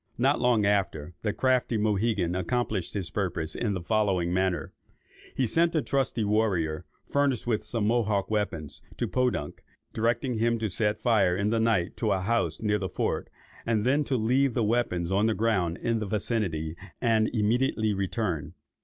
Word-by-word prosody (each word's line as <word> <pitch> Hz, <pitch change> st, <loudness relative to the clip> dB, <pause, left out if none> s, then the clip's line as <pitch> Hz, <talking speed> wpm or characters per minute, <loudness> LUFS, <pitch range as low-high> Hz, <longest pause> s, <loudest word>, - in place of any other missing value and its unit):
Not 135 Hz, +4 st, +2 dB
long 120 Hz, -4 st, +3 dB
after, 95 Hz, -6 st, 0 dB
the 105 Hz, -, 0 dB
crafty 125 Hz, 0 st, +1 dB
Mohegan 105 Hz, -3 st, +1 dB
accomplished 95 Hz, 0 st, -2 dB
his 95 Hz, -4 st, -3 dB
purpose 85 Hz, -5 st, -2 dB
in 105 Hz, -4 st, -1 dB
the 90 Hz, -, -4 dB
following 95 Hz, -4 st, +1 dB
manner. 95 Hz, -1 st, 0 dB, 0.6 s
He 130 Hz, -, +1 dB
sent 165 Hz, +8 st, +2 dB
a 155 Hz, -, +3 dB
trusty 135 Hz, -4 st, 0 dB
warrior, 100 Hz, -8 st, 0 dB, 0.2 s
furnished 140 Hz, -4 st, 0 dB
with 110 Hz, -3 st, 0 dB
some 110 Hz, 0 st, -2 dB
Mohawk 110 Hz, -3 st, +1 dB
weapons, 90 Hz, -9 st, -2 dB, 0.2 s
to -, -, -1 dB
Podunk, 125 Hz, -, -1 dB, 0.3 s
directing 115 Hz, +1 st, 0 dB
him 115 Hz, +1 st, +2 dB
to 110 Hz, -3 st, -2 dB
set 105 Hz, +1 st, 0 dB
fire 100 Hz, -7 st, +3 dB
in 100 Hz, +2 st, 0 dB
the 115 Hz, -, +2 dB
night 110 Hz, -6 st, +1 dB
to 110 Hz, -3 st, +1 dB
a 95 Hz, -, 0 dB
house 90 Hz, -4 st, 0 dB
near 105 Hz, -1 st, +1 dB
the 95 Hz, -, -3 dB
fort, -, -, -2 dB, 0.3 s
and 110 Hz, -2 st, 0 dB
then 140 Hz, +4 st, +3 dB
to 130 Hz, -, 0 dB
leave 125 Hz, +3 st, +2 dB
the 120 Hz, -, +2 dB
weapons 105 Hz, -6 st, 0 dB
on 100 Hz, +3 st, +3 dB
the 110 Hz, -, +1 dB
ground 95 Hz, -7 st, +1 dB
in 115 Hz, -1 st, -1 dB
the 110 Hz, -, -3 dB
vicinity, 95 Hz, -7 st, -1 dB, 0.3 s
and 110 Hz, -3 st, +2 dB
immediately 110 Hz, 0 st, +1 dB
return. 95 Hz, -6 st, -2 dB
110 Hz, 170 wpm, -27 LUFS, 95-115 Hz, 0.6 s, long